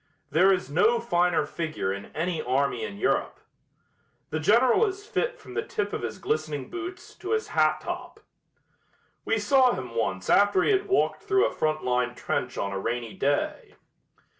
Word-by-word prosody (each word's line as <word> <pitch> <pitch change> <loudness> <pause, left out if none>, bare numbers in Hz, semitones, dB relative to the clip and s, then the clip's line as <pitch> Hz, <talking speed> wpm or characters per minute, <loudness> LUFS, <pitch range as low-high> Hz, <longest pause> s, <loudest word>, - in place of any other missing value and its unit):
There 185 +4 +5
is 185 -7 0
no 205 - +3
finer 180 -6 +1
figure 155 - -3
in 100 0 -7
any 165 +1 -1
army 130 -2 0
in 100 -2 -5
Europe. - - 0 0.9
The 155 - -1
General 235 - +4
is 400 +1 -6
fit - - -1
from - - -12
the - - 0
tip 205 - -3
of - - -2
his 115 -2 -4
glistening 150 -3 -3
boots 355 +1 -7
to 380 +5 -3
his 440 0 -1
hat - - +2
top. - - -6 1.1
We 225 - +1
saw 250 +4 +4
him 125 -2 -6
once 95 -5 -2
after 200 -2 +4
he - - +3
had 400 0 +1
walked 390 0 +1
through 395 0 +2
a - - -1
front 155 0 -1
line 125 0 0
trench - - -3
on 100 - -2
a 95 - -2
rainy 115 +1 -3
day. 140 +1 -1
175 Hz, 175 wpm, -26 LUFS, -, 1.1 s, There